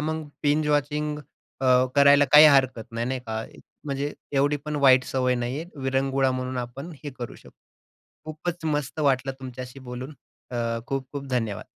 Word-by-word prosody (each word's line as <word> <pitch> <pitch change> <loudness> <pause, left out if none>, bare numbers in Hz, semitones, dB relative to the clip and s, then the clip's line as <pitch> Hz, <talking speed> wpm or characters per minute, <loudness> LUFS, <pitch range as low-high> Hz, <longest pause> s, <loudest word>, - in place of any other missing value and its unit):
मग 155 +1 -2 0.2
binge 150 +1 +2
watching 150 +1 0 0.4
अ, 130 - 0 0.3
करायला 140 0 +6
काही 150 +1 +10
हरकत 130 -5 +3
नाही, 115 +1 -2
नाही 130 0 -2
का, 110 0 -3 0.4
म्हणजे 140 0 -3 0.2
एवढीपण 145 +2 0
वाईट 130 -2 +5
सवय 125 -1 0
नाहीये. 125 +6 -3 0.2
विरंगुळा 135 0 +1
म्हणून 130 0 -3
आपण 130 +7 -6
हे 145 - -5
करू 120 - -6
शकतो. - - -17 0.7
खूपच 160 +2 -5
मस्त 145 +1 -3
वाटलं 135 -2 +1
तुमच्याशी 130 0 -8
बोलून. 130 +4 -7 0.4
अ, 115 -1 -2
खूप-खूप 135 +1 -4
धन्यवाद. 115 -5 -2
135 Hz, 150 wpm, -25 LUFS, 125-145 Hz, 0.7 s, काही